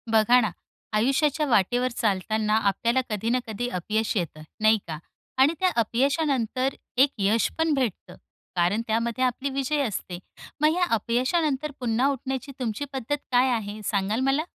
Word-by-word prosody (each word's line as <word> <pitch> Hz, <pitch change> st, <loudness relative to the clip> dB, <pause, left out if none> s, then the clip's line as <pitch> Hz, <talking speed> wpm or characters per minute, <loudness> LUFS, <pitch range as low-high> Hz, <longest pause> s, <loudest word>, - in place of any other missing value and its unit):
बघा 225 Hz, +3 st, +5 dB
ना, 215 Hz, -5 st, 0 dB, 0.4 s
आयुष्याच्या 275 Hz, +7 st, +2 dB
वाटेवर 245 Hz, +2 st, +2 dB
चालताना 215 Hz, +1 st, +1 dB
आपल्याला 230 Hz, +4 st, +1 dB
कधी 215 Hz, +1 st, -2 dB
ना 250 Hz, +2 st, +2 dB
कधी 225 Hz, +3 st, -3 dB
अपयश 215 Hz, +4 st, -1 dB
येत, 170 Hz, -4 st, -3 dB, 0.2 s
नाही 215 Hz, +1 st, +5 dB
का? 160 Hz, -2 st, -4 dB, 0.4 s
आणि 275 Hz, +5 st, +5 dB
त्या 370 Hz, -, +3 dB
अपयशानंतर 265 Hz, +1 st, 0 dB, 0.2 s
एक 270 Hz, +3 st, +6 dB
यश 210 Hz, +3 st, +2 dB
पण 320 Hz, -1 st, +2 dB
भेटतं 255 Hz, -9 st, -2 dB, 0.4 s
कारण 180 Hz, +5 st, +2 dB
त्यामध्ये 230 Hz, +3 st, 0 dB
आपला 255 Hz, +2 st, 0 dB
विजय 275 Hz, +2 st, 0 dB
असतो. 195 Hz, -7 st, -3 dB, 0.4 s
मग 305 Hz, +1 st, +4 dB
या 360 Hz, -, +1 dB
अपयशानंतर 265 Hz, -, 0 dB
पुन्हा 245 Hz, +1 st, +1 dB
उठण्याची 265 Hz, +1 st, -4 dB
तुमची 240 Hz, +2 st, -2 dB
पद्धत 265 Hz, +2 st, -1 dB, 0.2 s
काय 250 Hz, +1 st, +4 dB
आहे, 215 Hz, -2 st, -3 dB
सांगाल 205 Hz, +2 st, 0 dB
मला? 270 Hz, +3 st, +2 dB
240 Hz, 150 wpm, -25 LUFS, 215-270 Hz, 0.4 s, एक